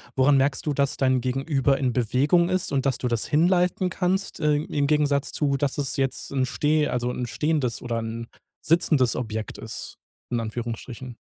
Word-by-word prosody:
woran 135 +1 +4
merkst 135 +1 +1
du, 150 - 0
dass 140 -1 0
dein 130 -2 +2
Gegenüber 135 +1 +1
in 125 -3 0
Bewegung 140 +9 +2
ist 185 -1 0
und 140 0 0
dass 135 - +1
du 125 - -2
das 115 -2 -1
hin 155 +4 +3
leisten 180 0 +1
kannst, 185 +1 -1
äh, 150 -1 +2
im 145 -1 -1
Gegensatz 145 -1 +1
zu 140 -2 0
dass 140 0 -1
es 140 -3 0
jetzt 135 0 -1
'n 130 -2 +1
steh 150 +2 +1
also 125 0 -1
'n 125 -1 -4
stehendes 145 -3 -1
oder 115 -1 -2
'n 115 +1 -5 0.3
sitzendes 155 -6 +3
Objekt 110 -3 -4
ist, - - -5 0.3
in 120 - 0
Anführungsstrichen. 120 +2 -6
135 Hz, 185 wpm, -25 LUFS, 125-150 Hz, 0.3 s, woran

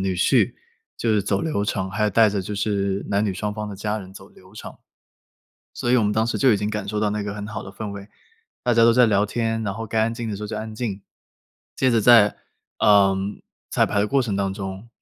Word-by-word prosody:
女 95 -1 -1
婿 90 - +2 0.4
就 115 - -1
是 105 -1 +2
走 100 +1 -1
流 155 -11 -1
程， 95 -2 -2
还 100 +3 -2
有 105 - +1
带 110 +2 +4
着 100 -1 -1
就 100 +3 -5
是 100 -1 -1
男 100 +2 +1
女 100 - -1
双 105 +2 -3
方 105 0 -5
的 100 - -7
家 105 +2 -2
人 95 -2 -10
走 95 0 -12
流 95 +1 -19
程。 - - -9 1.0
所 120 - -3
以 125 - +5
我 115 - +3
们 105 - +1
当 110 +1 +1
时 120 - -2
就 130 -3 +4
已 - - +3
经 105 +1 -2
感 105 -2 -4
受 105 +1 -2
到 105 - +1
那 105 0 -2
个 100 0 -5
很 105 -1 -6
好 105 - -6
的 - - -9
氛 105 +1 -6
围， 100 0 -9 0.5
大 125 - +1
家 115 - +5
都 115 - +6
在 125 0 +6
聊 105 -1 +2
天， 115 +1 -2
然 100 -3 -2
后 115 +1 -5
该 110 +1 0
安 110 +1 +1
静 115 -1 -5
的 105 - -4
时 105 - -8
候 - - -3
就 110 - -5
安 110 0 -6
静。 105 -4 -4 0.7
接 130 - +2
着 115 -2 +3
在， 110 -2 +6 0.4
呃， 100 -2 +5 0.6
彩 - - +3
排 100 - 0
的 105 - +1
过 135 +4 +2
程 105 -5 -2
当 100 -1 -1
中， 95 +2 -7
105 Hz, 280 characters per minute, -23 LUFS, 100-110 Hz, 1.0 s, 都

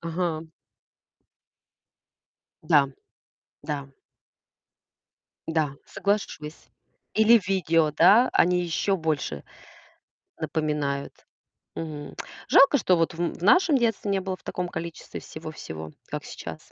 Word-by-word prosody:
Ага. 165 -1 -3 2.1
Да. 150 -3 +4 0.8
Да. 145 -2 -4 1.6
Да. 155 -4 0
Соглашусь. 185 -7 -3 0.5
Или 220 +1 +6
видео, 165 -5 +2
да, 205 - +6
они 180 +1 +3
ещё 185 +3 0
больше 155 - -2 1.0
напоминают. 150 -3 -2 0.5
Мгм. 150 -3 -6 0.3
Жалко, 275 +1 +6
что 185 -6 +3
вот 165 0 +1
в 165 - -11
м 170 - 0
в 170 - -11
нашем 330 - +5
детстве 225 -4 0
не 195 -1 +1
было 190 0 -3
в - - -26
таком 180 0 -3
количестве 170 -1 -6
всего-всего, 80 0 -8 0.2
как - - -5
сейчас. - - -9
165 Hz, 105 wpm, -26 LUFS, 150-195 Hz, 2.1 s, Или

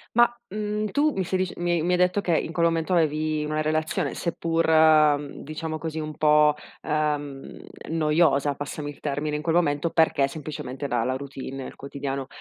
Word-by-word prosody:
Ma, 240 0 +6 0.2
mhmm, 210 +1 -2
tu 300 +2 +2
mi 190 - 0
stai 185 +1 -1
dic 185 -1 -2
mi 175 -1 0
mi 180 +2 +1
hai - - +3
detto 180 +3 +2
che 170 -4 +1
in 165 - -3
quel 170 0 +3
momento 165 +2 0
avevi 155 -2 +1
una 155 0 -1
relazione 155 +1 -1
seppur 160 -3 +3
diciamo 155 +1 -5
così 160 -1 -4
un 155 -1 -5
po' 150 -1 +5 0.3
uhm, 145 -2 -2 0.3
noiosa, 150 -3 +2
passami 145 +1 -5
il 145 - -16
termine 150 +1 -2
in - - -5
quel 165 +1 0
momento 145 -1 +2
perché 160 -4 +3
semplicemente, 140 -2 -6
dalla 120 +1 0
routine, 135 0 -6
nel - - -9
quotidiano. 140 -1 -5
155 Hz, 175 wpm, -25 LUFS, 145-165 Hz, 0.3 s, Ma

